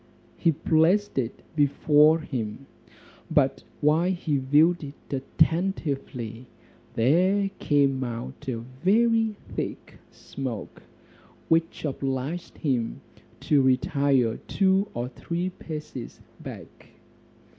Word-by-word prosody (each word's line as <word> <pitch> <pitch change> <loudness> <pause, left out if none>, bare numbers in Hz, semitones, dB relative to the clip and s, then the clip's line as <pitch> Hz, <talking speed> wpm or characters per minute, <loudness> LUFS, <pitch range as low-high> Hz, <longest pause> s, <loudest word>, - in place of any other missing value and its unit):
He 165 - +2
placed 165 +4 +2
it 120 -2 -4
before 150 +2 +4
him, 125 -3 -5 0.6
but - - +2 0.2
while 155 +4 +3
he 165 -5 -1
viewed 150 +6 +3
it 140 0 -10
attentively, 135 - -1 0.5
there 185 - +3
came 140 -3 +2
out 120 +1 -6
a 115 -3 -3 0.2
very 225 +2 +3 0.2
thick - - -5
smoke, 130 -6 -7 0.7
which 165 0 +1
obliged 135 +4 -3
him 125 -7 -1 0.4
to 145 -2 +3
retire 130 -2 +2
two 195 +1 +2
or 120 +1 -2
three 170 +7 -3
paces 150 -7 -8 0.2
back. - - -10
150 Hz, 95 wpm, -26 LUFS, 130-170 Hz, 0.7 s, before